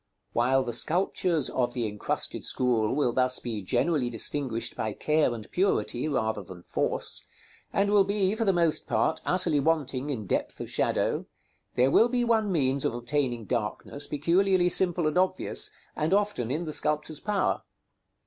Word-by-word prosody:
While 130 +3 +3
the 120 -2 -4
sculptures 170 +2 +1
of 125 -2 0
the 120 -3 -1
incrusted 105 -1 -3
school 120 -3 +1
will 135 -5 +1
thus 130 0 +2
be 115 -4 -4
generally 125 - +1
distinguished 120 0 -2
by 110 -1 -2
care 155 -3 +2
and 115 -3 -6
purity 125 - 0
rather 110 -7 -1
than 90 -2 -11
force, - - -2 0.4
and 200 +1 +2
will 205 -1 +6
be, 200 0 +1
for 225 +1 -1
the 200 - +3
most 170 -3 +1
part, - - +1
utterly 175 -5 +2
wanting 145 -3 0
in 115 -7 -3
depth - - -2
of - - -6
shadow, - - 0 0.5
there 130 +2 +3
will 230 +9 +5
be 245 0 +1
one 220 -3 +2
means 135 -5 +1
of - - 0
obtaining 120 -2 -1
darkness 120 +5 -3
peculiarly 180 +4 +2
simple 175 -2 +3
and 155 +3 +2
obvious, 185 0 +1 0.3
and 160 +5 +1
often 205 - 0
in 155 +6 -2
the 155 - -5
sculptor's 150 0 -2
power. 205 -2 0
145 Hz, 165 wpm, -27 LUFS, 120-180 Hz, 0.5 s, will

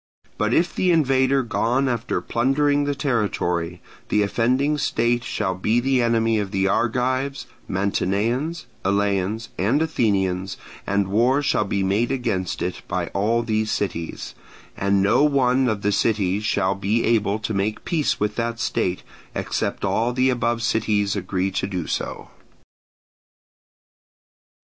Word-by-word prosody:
But 105 +1 +1
if 170 +7 +2
the 185 - +1
invader 135 -4 +3
be 120 - -12
gone 125 +5 +1
after 120 -1 -1
plundering 145 +4 +1
the 145 0 -1
territory, 90 - -1 0.3
the 105 - +3
offending 130 +8 +1
state 120 -1 +1
shall 95 -6 -2
be 105 +6 +1
the 130 0 +2
enemy 115 -1 +2
of 100 -2 -2
the 95 0 0
Argives, 130 +6 0 0.2
Mantineans, 110 - -1 0.2
Eleans, 100 +2 0
and 115 +10 +2
Athenians, 100 - 0 0.3
and 100 -1 +1
war 120 +8 +2
shall 105 - +1
be 100 0 -1
made 105 +6 +1
against 110 -9 -2
it 90 - -3
by - - -2
all 115 +4 +1
these 110 -1 0
cities: 85 -6 -3 0.4
and 100 0 +1
no 100 +8 +4
one 130 -3 +3
of 105 -2 -2
the 105 - +2
cities 100 -2 +1
shall 100 -3 +1
be 100 +4 0
able 105 -3 +2
to 110 0 -4
make 100 +2 -2
peace 160 -4 0
with 105 0 -1
that 115 0 -2
state, 90 -4 -1 0.3
except - - -2
all 115 +2 +1
the 130 +1 +2
above 120 -1 -1
cities 105 -3 +1
agree 95 0 -1
to 95 - -2
do 90 -4 -3
so. - - -4
110 Hz, 145 wpm, -23 LUFS, 100-125 Hz, 0.4 s, no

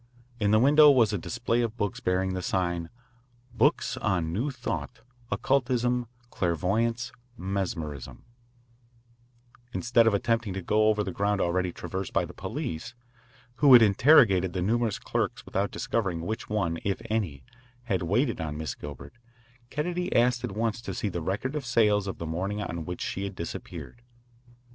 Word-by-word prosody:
In 105 -2 +2
the 110 - +5
window 145 +5 +7
was 120 -6 +4
a - - +1
display 115 +8 -1
of 115 -1 -2
books 105 -3 -2
bearing 95 +1 0
the 90 - -3
sign: 85 -2 -1 0.6
BOOKS 125 +7 +2
ON 90 -6 0
NEW 120 +10 -1
THOUGHT, 125 -2 -5 0.3
OCCULTISM, 125 -2 +1 0.2
CLAIRVOYANCE, 110 +8 0 0.3
MESMERISM 85 -8 -4 1.5
Instead 120 -2 +3
of 110 - +4
attempting 115 -1 0
to 95 - -4
go 110 +4 +3
over 105 -1 +2
the 95 - -4
ground 100 +2 0
already 90 0 0
traversed 95 +2 -5
by - - +2
the - - -11
police, 95 +10 -5 0.6
who 145 -1 +5
had 120 -2 +10
interrogated 100 - +5
the 90 - -2
numerous 115 +1 +1
clerks - - -2
without 100 +1 -1
discovering 95 -8 -2
which 110 +6 -4
one, 90 -6 -1
if 100 -1 -1
any, 90 -12 -1 0.4
had 100 -7 -1
waited 100 - +1
on 75 -2 -4
Miss 80 0 -3
Gilbert, 70 -3 -9 0.6
Kennedy 175 +6 -2
asked 120 +1 +3
at 120 -5 -3
once 115 +1 -1
to - - -5
see 105 - -1
the 85 -2 -4
record 100 - -2
of 150 - -2
sales 105 -4 +2
of 95 - -4
the 85 - -5
morning 95 +6 -2
on 85 -5 -4
which 90 +1 -5
she 95 - -3
had 100 -1 -6
disappeared. 85 +7 -7
105 Hz, 160 wpm, -27 LUFS, 90-120 Hz, 1.5 s, had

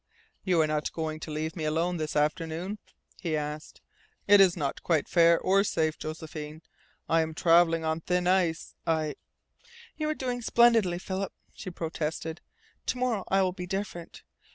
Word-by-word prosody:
"You 180 -3 +2
are - - +4
not 150 0 -1
going 155 -1 -3
to 160 - -7
leave 155 +1 -3
me 160 - -4
alone 165 +3 0
this 155 -1 -3
afternoon?" 165 +6 -1 0.4
he 165 -4 -1
asked. 150 +1 -6 0.5
"It 205 -1 +8
is 185 -2 +5
not 140 -4 -2
quite 160 -4 +1
fair, 170 -1 +5
or 195 +1 +3
safe, 160 -5 0
Josephine. 155 0 -7 0.4
I 165 0 +3
am 160 0 -3
travelling 165 -1 +4
on 160 +1 -1
thin 180 +1 0
ice. 180 -3 +1
I 155 -2 +1 0.4
" 470 0 -22
"You 305 -1 -1
are 310 - -1
doing 250 -3 -3
splendidly, 225 -6 +4
Philip," 190 +2 -4 0.2
she 190 - -7
protested. 160 -1 -4 0.5
"To - - 0
morrow 245 -6 0
I 195 0 +3
will 185 -1 0
be 180 -1 -6
different. 190 -3 -5
165 Hz, 170 wpm, -28 LUFS, 160-190 Hz, 0.5 s, It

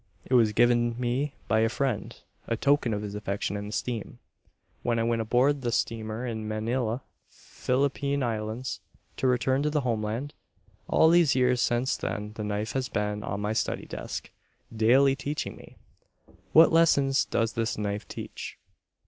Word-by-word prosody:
It - - -4
was 115 -4 +5
given 120 +1 +3
me 130 +4 -1
by 110 - +3
a 115 0 +3
friend, 130 -5 -2 0.3
a 115 - -1
token 140 -1 +2
of 105 -1 -2
his 100 -1 -5
affection 105 -1 -3
and 100 0 -4
esteem, 115 +1 -4 0.6
when 120 -1 0
I 115 - +1
went 115 0 +1
aboard 130 +5 +2
the 120 -2 -1
steamer 115 0 -2
in 110 -3 -4
Manila, 115 +3 -1 0.3
Philippine 140 +1 -1
Islands, 115 +2 -3 0.4
to 130 - +1
return 130 +2 +2
to 150 - +1
the 150 -1 0
homeland. 115 +2 -2 0.5
All 160 - +5
these 170 -5 +5
years 125 -1 +3
since 120 +2 +1
then 105 0 -4
the 110 - -5
knife 105 +1 -2
has 130 -1 -2
been 105 0 -2
on 100 -1 -4
my 105 +1 -1
study - - -1
desk, - - -6 0.4
daily 130 +5 +5
teaching 145 +2 -4
me. - - -15 0.7
What 160 +1 +7
lessons 140 -5 +4
does 115 -1 0
this 115 0 -1
knife 105 0 -3
teach? - - -7
120 Hz, 160 wpm, -27 LUFS, 110-135 Hz, 0.7 s, What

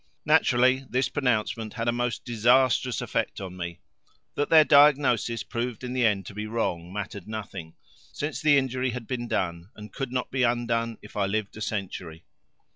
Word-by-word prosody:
Naturally 130 +2 +4
this 130 +1 0
pronouncement 115 -5 -1
had 115 -1 -3
a - - +4
most 120 -1 -2
disastrous 125 +2 +3
effect - - -2
on 95 -2 -7
me. 85 -1 -6 0.5
That 145 - -1
their 160 -1 +8
diagnosis 140 -6 +4
proved 120 0 -4
in 125 0 -4
the 125 -2 +3
end 100 -3 0
to 100 - -9
be 105 +1 -5
wrong 90 -6 -2
mattered 100 -1 -6
nothing, 100 -6 -7 0.4
since 150 +2 -4
the 150 -2 +5
injury 130 -1 0
had 125 -1 -5
been 120 0 -4
done 85 -3 -2
and 105 -1 -11
could 135 -3 -4
not 125 -1 -2
be 130 - -1
undone 120 -2 0
if 105 - -13
I 100 -2 +1
lived 105 0 -2
a 110 - -9
century. 90 -6 -5
115 Hz, 180 wpm, -26 LUFS, 105-125 Hz, 0.5 s, their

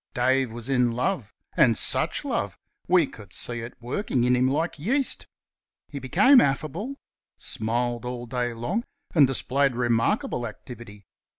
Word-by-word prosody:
Dave 130 0 +2
was 120 +1 -6
in 125 -3 +2
love. 125 - -1 0.2
And 130 -9 +5
such - - +1
love! - - -2 0.3
We 175 -3 +5
could 105 -7 -13
see 120 -1 -5
it 115 +1 -7
working 125 - -1
in 125 0 +3
him 125 +1 +3
like 155 +3 -1
yeast. 260 - 0 0.6
He 145 - -6
became 205 - +6
affable 155 - -1 0.4
smiled 120 +2 -2
all 125 0 -5
day 120 0 -2
long 175 - -2 0.3
and 150 -5 +6
displayed 135 0 +1
remarkable 120 0 0
activity. 105 -2 -11
125 Hz, 140 wpm, -25 LUFS, 120-150 Hz, 0.6 s, became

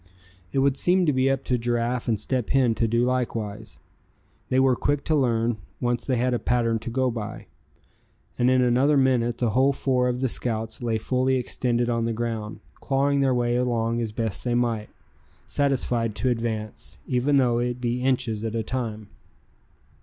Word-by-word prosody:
It - - -3
would 135 0 +2
seem 180 +4 +3
to 150 - +2
be 130 +1 +2
up 135 -1 0
to 125 -1 0
Giraffe 120 +1 -1
and 110 -3 +1
Step 125 +2 -2
Hen 130 -4 +3
to 115 +1 0
do 115 +2 +1
likewise. 115 -5 -2 0.7
They 130 - +2
were 130 -1 +4
quick 145 +2 -1
to 155 - +1
learn, 120 -4 +1 0.2
once 120 -1 -1
they 130 - +1
had 125 +1 +1
a 120 - 0
pattern 115 -2 +1
to 115 - -6
go 130 +1 0
by. 110 -3 -6 0.9
And 125 +1 +2
in 130 0 +4
another 130 +4 +3
minute 120 -3 +2
the 120 -3 0
whole 135 +5 +3
four 130 -2 +1
of 125 0 -2
the 130 - +2
scouts 115 -2 -3
lay 115 -2 0
fully 130 +4 0
extended 120 -1 0
on 115 -1 0
the 115 - -1
ground, 110 -2 -4 0.2
clawing 140 +1 +1
their 135 -2 +2
way 120 0 +1
along 120 -1 0
as 110 -2 -2
best 110 -1 -3
they 120 -1 0
might; 115 -3 0 0.6
satisfied 125 -5 0
to 130 - 0
advance, 110 -3 -4
even 130 +3 +1
though 125 -3 +3
it 125 0 -2
be 120 0 -1
inches 125 -4 0
at 115 0 -3
a 115 - -1
time. 110 -3 -4
120 Hz, 185 wpm, -25 LUFS, 115-130 Hz, 0.9 s, were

